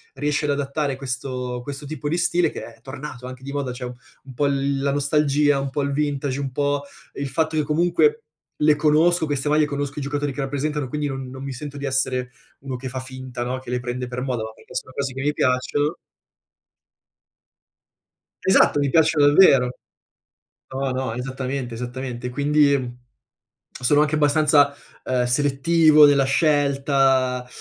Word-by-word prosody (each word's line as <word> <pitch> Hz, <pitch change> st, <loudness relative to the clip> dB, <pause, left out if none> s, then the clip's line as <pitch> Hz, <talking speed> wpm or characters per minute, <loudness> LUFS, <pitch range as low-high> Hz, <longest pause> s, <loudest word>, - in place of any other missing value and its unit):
riesci 150 Hz, 0 st, -1 dB
ad -, -, -1 dB
adattare 140 Hz, 0 st, -1 dB
questo 125 Hz, -2 st, -4 dB
questo 140 Hz, +2 st, -7 dB
tipo 150 Hz, 0 st, -4 dB
di 170 Hz, -, 0 dB
stile, 175 Hz, 0 st, +2 dB
che -, -, -7 dB
è -, -, -28 dB
tornato 135 Hz, -2 st, -8 dB
anche 130 Hz, 0 st, -10 dB
di 140 Hz, -, -6 dB
moda, 140 Hz, -3 st, -2 dB
cioè 125 Hz, -, -8 dB
un 125 Hz, -, -6 dB, 0.3 s
un 130 Hz, -, -12 dB
po' 145 Hz, +4 st, 0 dB
l 140 Hz, 0 st, 0 dB
la 140 Hz, -, +1 dB
nostalgia, 145 Hz, 0 st, +2 dB
un 135 Hz, -, -3 dB
po' 145 Hz, +1 st, -1 dB
il 140 Hz, -, -1 dB
vintage, 140 Hz, -2 st, -1 dB
un 135 Hz, -2 st, -3 dB
po' 145 Hz, +1 st, 0 dB, 0.3 s
il 140 Hz, -, -4 dB
fatto 160 Hz, +1 st, -1 dB
che -, -, +3 dB
comunque 175 Hz, -, +2 dB, 0.3 s
le 150 Hz, 0 st, +4 dB
conosco 160 Hz, +3 st, +3 dB
queste 145 Hz, 0 st, -1 dB
maglie, 150 Hz, 0 st, +4 dB
conosco 145 Hz, 0 st, -4 dB
i -, -, -4 dB
giocatori 145 Hz, 0 st, -2 dB
che 140 Hz, -, -4 dB
rappresentano, 145 Hz, +1 st, -2 dB
quindi 150 Hz, +2 st, -2 dB
non 135 Hz, -2 st, -5 dB
non 130 Hz, +1 st, -8 dB
mi 135 Hz, -1 st, -5 dB
sento 145 Hz, +2 st, -7 dB
di 140 Hz, -, -5 dB
essere 130 Hz, -2 st, -1 dB, 0.3 s
uno 135 Hz, -1 st, -5 dB
che 130 Hz, +1 st, -6 dB
fa 130 Hz, +1 st, -5 dB
finta, 130 Hz, -1 st, -6 dB
no, 130 Hz, +1 st, -3 dB
che 130 Hz, -, -12 dB
le 125 Hz, -, 0 dB
prende 125 Hz, 0 st, -4 dB
per 125 Hz, 0 st, -5 dB
moda, 125 Hz, -3 st, -2 dB
ma 110 Hz, -, -5 dB
perché -, -, -17 dB
sono 130 Hz, -, -4 dB
cose 135 Hz, -2 st, -2 dB
che 130 Hz, -, -5 dB
mi 145 Hz, +1 st, +1 dB
piacciono 145 Hz, +4 st, 0 dB, 2.5 s
Esatto, 190 Hz, -5 st, +4 dB
mi 140 Hz, -1 st, +1 dB
piacciono 155 Hz, -2 st, +4 dB
davvero. 135 Hz, -6 st, +5 dB, 0.9 s
No, 135 Hz, +1 st, -2 dB
no, 130 Hz, -2 st, -2 dB
esattamente, 130 Hz, 0 st, -4 dB
esattamente. 125 Hz, 0 st, -5 dB
Quindi, 140 Hz, -3 st, +1 dB, 0.7 s
sono 145 Hz, +4 st, +3 dB
anche 150 Hz, 0 st, +2 dB
abbastanza, 145 Hz, -1 st, +4 dB, 0.3 s
uhm, 125 Hz, -1 st, 0 dB
selettivo 150 Hz, +4 st, +5 dB
nella 140 Hz, -2 st, +4 dB
scelta 135 Hz, -3 st, +2 dB
140 Hz, 175 wpm, -22 LUFS, 130-150 Hz, 2.5 s, davvero